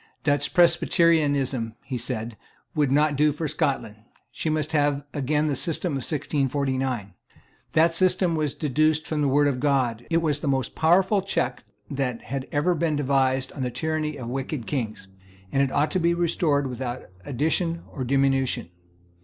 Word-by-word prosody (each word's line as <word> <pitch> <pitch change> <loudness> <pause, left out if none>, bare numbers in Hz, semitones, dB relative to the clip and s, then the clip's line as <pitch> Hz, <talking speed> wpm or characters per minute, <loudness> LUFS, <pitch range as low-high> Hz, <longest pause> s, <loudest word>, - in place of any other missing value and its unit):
Dutch 145 -1 0
Presbyterianism, 145 -9 +3
he 135 - -5
said, 115 -2 -4 0.4
would 145 -4 +1
not 150 +1 +3
do 150 +2 +3
for 150 +2 -3
Scotland. 140 -8 -1 0.3
She 160 - -3
must 155 -1 -1
have 145 -2 +1
again 150 +1 0
the 145 -2 0
system 165 +5 -1
of - - 0
1649. 135 - -1 0.6
That 165 +1 +4
system 180 0 +2
was 150 -3 -1
deduced 155 +1 +1
from 155 -1 -2
the 145 - +2
Word 145 +2 +3
of 135 -3 0
God: 125 -5 0
it 165 - +2
was 150 -2 +1
the 150 - -4
most 135 -3 0
powerful 190 +5 +3
check 130 - -2 0.3
that 130 -4 -2
had 135 0 -4
ever 150 +5 +2
been 165 -2 0
devised 135 -2 +1
on 140 - -6
the 125 - 0
tyranny 155 +2 -2
of 125 -3 -6
wicked 130 0 -4
kings; 110 -8 -4 0.4
and 135 - +2
it 135 -1 +1
ought 150 - +1
to 185 - +1
be 170 0 +2
restored 165 -4 +1
without 125 -1 -4 0.2
addition 160 - 0
or 135 - -4
diminution. 135 -7 +1
145 Hz, 165 wpm, -25 LUFS, 130-155 Hz, 0.6 s, That